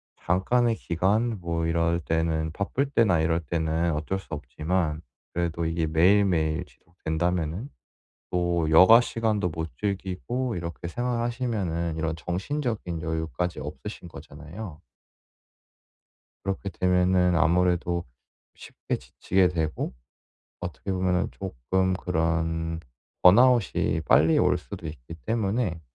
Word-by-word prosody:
잠깐의 115 +7 +1
기간 105 +6 0
뭐 85 -1 -1
이럴 85 +1 +1
때는 80 -1 0
바쁠 125 +8 -1
때나 100 - +3
이럴 80 +1 +2
때는 80 +1 0
어쩔 80 +6 -2
수 - - -15
없지만 75 +3 -2 0.3
그래도 85 -1 -1
이게 80 0 0
매일매일 85 -1 +3
지속된다면은 85 - -3 0.6
또 85 -2 0
여가시간도 110 +2 +5
못 80 0 -4
즐기고 100 +5 -2
이렇게 85 0 -5
생활하시면은 115 -8 -2
이런 80 0 -1
정신적인 95 - -3
여유까지 80 +2 -2
없으신 - - -7
거잖아요. 80 +3 -9 1.6
그렇게 100 0 -3
되면은 90 -1 +2
아무래도 85 0 +2 0.5
쉽게 - - -5
지치게 90 +8 +1
되고 80 -6 -2 0.7
어떻게 90 +3 -5
보면은 90 0 +1
쪼끔 95 +2 -1
그런 80 -2 -1 0.4
번아웃이 110 -5 +5
빨리 80 +1 +5
올 - - +3
수도 - - -8
있기 75 +1 -9
때문에 105 -5 0
85 Hz, 270 characters per minute, -26 LUFS, 80-95 Hz, 1.6 s, 여가시간도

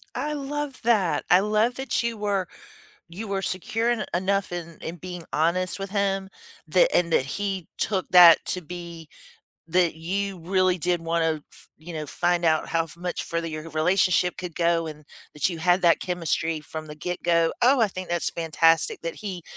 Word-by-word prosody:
I 300 0 -2
love 290 -1 -4
that 200 -10 +2
I 180 - +7
love 215 +4 +1
that 265 +1 -1
you 235 -1 -2
were 200 -3 -1 0.6
you 200 +6 -7
were 195 -1 -2
secure 225 +6 -1
en 240 -2 0
enough 195 +1 0
in 170 -2 -6
in 165 +2 -6
being 180 -1 -8
honest 180 +4 +1
with 195 0 -5
him 195 -1 0 0.4
that - - +4
and 170 -2 +1
that 130 - +3
he 190 +2 -4
took 190 -3 -1
that 175 -2 +8
to 180 - -2
be 170 -1 -9 0.6
that 175 -2 +2
you 195 +3 -3
really 185 +1 +1
did 175 0 0
wanna 165 -2 0
f - - -17
you 165 +3 -10
know, 155 -2 -5
find 175 +4 0
out 155 -1 +2
how 165 0 +1
f 165 - -14
much 180 0 -4
further 170 0 -3
your 155 0 -6
relationship 180 +3 +2
could 180 -3 -6
go, 170 -1 +1
and 150 -1 -9 0.3
that 150 +5 +1
you 170 - -5
had 180 +2 +2
that 170 -1 +4
chemistry 165 -2 -1
from 155 +1 -8
the 150 - -8
get-go. 170 0 0
Oh, 260 +3 +5
I 215 - +3
think 185 -1 -7
that's 175 -1 0
fantastic 165 0 +2
that 165 0 -4
he 190 -5 -6
175 Hz, 185 wpm, -25 LUFS, 165-195 Hz, 0.6 s, that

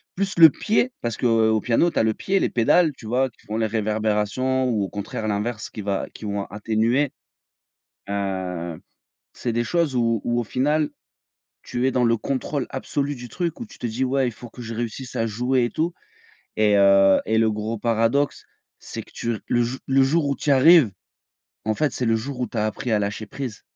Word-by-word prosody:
plus 195 +1 -2
le 160 -1 +11
pied, 220 - 0
parce 115 -2 -2
qu'au 110 -2 +3
piano, 145 +8 +2
tu - - 0
as - - +3
le 110 0 +2
pied, 195 0 0
les - - +1
pédales, 155 +8 +3
tu 110 - -13
vois? 130 +4 +1
Qui - - -27
font 110 +1 -3
les 110 -1 +1
réverbérations 110 +4 0
ou 110 -5 0
au 95 - -3
contraire 105 +2 -5
l'inverse 105 +2 -2
qui 105 - -7
va 100 -1 -2
qui 110 - -9
vont 100 -1 -2
atténuer, 115 +7 0 1.0
heu, 90 -4 -3 0.5
c'est 120 - -3
des 120 +1 0
choses 160 0 0
où 115 -2 +1
où 120 0 +1
au - - -3
final, 150 +6 +1 0.7
tu 125 +2 -2
es - - +3
dans 125 -1 +1
le 115 0 +3
contrôle 140 +2 -2
absolu 145 0 -2
du 120 0 -9
truc, 170 - -3
où 235 - -5
tu - - -16
te 120 - -3
dis: 120 +4 -1
«Ouais, 135 0 +1
il - - -5
faut 120 +2 -11
que 120 +1 -11
je 115 0 -6
réussisse 120 +2 -5
à 115 - 0
jouer 125 +3 +1
et - - -5
tout». 165 +2 -1 0.7
Et 105 -1 +4
heu, 100 -1 +5
et 110 0 +1
le 110 -1 +3
gros 110 +2 -3
paradoxe, 115 +5 +1 0.4
c'est - - -7
que - - -21
tu 115 -1 -2
r - - -8
le 120 - +2
jou 120 +3 -1
le 135 0 +3
jour 150 +3 +2
où 140 - 0
tu 145 - -3
y - - +6
arrives, 145 -2 +7 0.8
en 110 - +1
fait, 150 0 0
c'est 125 - -2
le 115 0 +3
jour 125 +3 -5
où 125 - 0
tu 115 - -9
as 105 - +1
appris 115 +2 -3
à 105 - +3
lâcher 105 +1 -3
prise. 125 -3 -6
120 Hz, 220 wpm, -23 LUFS, 110-135 Hz, 1.0 s, le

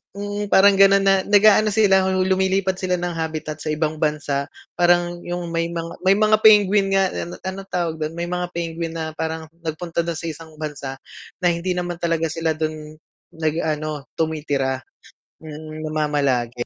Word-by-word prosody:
mm, 205 +1 -4
parang 200 +1 +6
gano'n 195 0 +6
na 195 -1 +3
nag-aano 210 +1 +5
sila, 195 -3 +4
lumilipat 190 0 +1
sila 180 -1 0
ng 175 -1 -3
habitat 155 -1 -4
sa 155 - -2
ibang 155 0 -1
bansa, 145 -2 -1 0.3
parang 175 0 +2
yung 175 0 -4
may 165 0 -1
mga 165 0 -5
may 190 - +4
mga 215 0 +4
penguin 205 -2 +6
nga, 195 0 +3
an 175 - -5
anong 195 +1 -6
tawag 170 -3 -1
dun, 155 - -3
may 170 0 -2
mga 180 0 -2
penguin 165 -1 -3
na 160 0 -3
parang 160 0 -4 0.2
nagpunta 165 +1 -2
dun 170 -1 -3
sa 165 - -5
isang 160 +1 -9
bansa 140 -3 -6 0.4
na - - +5
hindi 170 +2 -2
naman 175 -1 -3
talaga 165 -1 0
sila 165 0 -1
dun 155 -1 -4 0.4
nag 160 -1 -2
ano, 155 -2 -3
tumitira, 145 -4 -1 0.6
mm, 155 0 -8
namamalagi, 140 -6 0
165 Hz, 165 wpm, -21 LUFS, 155-190 Hz, 0.6 s, parang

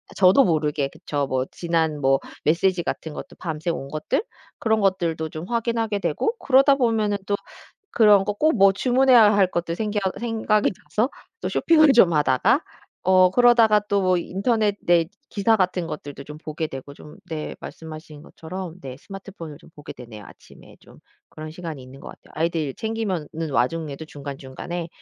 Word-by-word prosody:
저도 195 +8 +6
모르게 150 -4 0
그쵸 145 -3 -3 0.2
지난 160 -3 -1
뭐 135 0 +3 0.3
메시지 175 +3 +2
같은 160 - -4
것도 - - -9
밤새 165 0 -3
온 135 -5 -5
것들 155 - -1 0.4
그런 220 -1 +1
것들도 170 -5 0
좀 155 +2 -7
확인하게 230 -3 -1
되고 450 - -1
그러다 275 +1 +5
보면은 225 -5 +1
또 205 - +1 0.6
그런 210 -3 +5
거 205 - -1
꼭 310 +6 +2
뭐 195 0 +6
주문해야 245 -3 +5
할 190 -2 +3
것도 170 -1 -2
생겨 210 +1 -2 0.2
생각이 220 -3 +1
나서 230 +6 0 0.3
또 - - -2
쇼핑을 310 -3 +4
좀 185 -8 +5
하다가 140 -4 +3 0.4
어 185 0 +5
그러다가 230 -3 +5
또 185 -3 +2
인터넷 205 +4 0
네 170 -1 +3 0.2
기사 220 +2 +2
같은 180 -2 0
것들도 145 -2 -7
좀 150 +1 -9
보게 155 +1 -4
되고 135 0 -9 0.4
네 155 -2 -4
좀 - - -16
말씀하신 155 -1 -10
것처럼 180 +1 -8
네 130 -2 -7
스마트폰을 190 -5 -10
좀 - - -18
보게 150 - -10
되네요. 115 -4 -11
아침에 - - -17
좀 - - -18 0.3
그런 155 0 -9
시간이 160 -4 -7
있는 130 +2 -13
것 - - -11
같아요. - - -15
아이들 160 -3 -1
챙기면은 185 -8 -3
와중에도 150 +3 -1
중간중간에 145 +4 -7
175 Hz, 340 characters per minute, -23 LUFS, 155-210 Hz, 0.6 s, 저도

